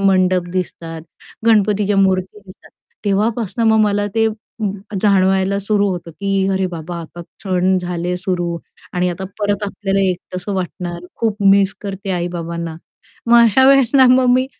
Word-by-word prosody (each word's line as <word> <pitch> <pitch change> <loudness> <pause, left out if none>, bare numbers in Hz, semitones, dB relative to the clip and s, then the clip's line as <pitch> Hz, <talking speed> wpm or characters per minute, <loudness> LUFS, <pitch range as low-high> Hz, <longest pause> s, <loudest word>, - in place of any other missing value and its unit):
मंडप 185 -2 +2
दिसतात, 165 -3 -4 0.4
गणपतीच्या 210 -2 +3
मूर्ती 190 +1 +1
दिसतात. 185 - -16 0.3
तेव्हापासून 220 +2 0
मग 220 0 +4
मला 205 0 0
ते 225 0 +3 0.7
जाणवायला 195 -1 +2
सुरू 200 0 +1
होतं, 175 -2 -5
की 195 +2 -1
अरे 190 0 0
बाबा 170 +1 -6
आता 170 +1 -10
क्षण 185 +1 -1
झाले 175 0 -3
सुरू 175 -2 -2 0.4
आणि 180 0 0
आता 180 +2 -4
परत 205 0 -1
आपल्याला 195 -1 -1
एकटसं 180 +2 -6
वाटणार, 175 -1 -5
खूप 215 -2 -1
मिस 195 -1 +3
करते 195 -1 -5
आई-बाबांना. 170 -2 -4 0.5
मग 235 - +6
अशा 260 +4 +4
वेळेस 270 -4 +5
ना, 260 -1 +7
मग 255 0 +4
मी 255 +1 +2
190 Hz, 145 wpm, -18 LUFS, 180-205 Hz, 0.7 s, ना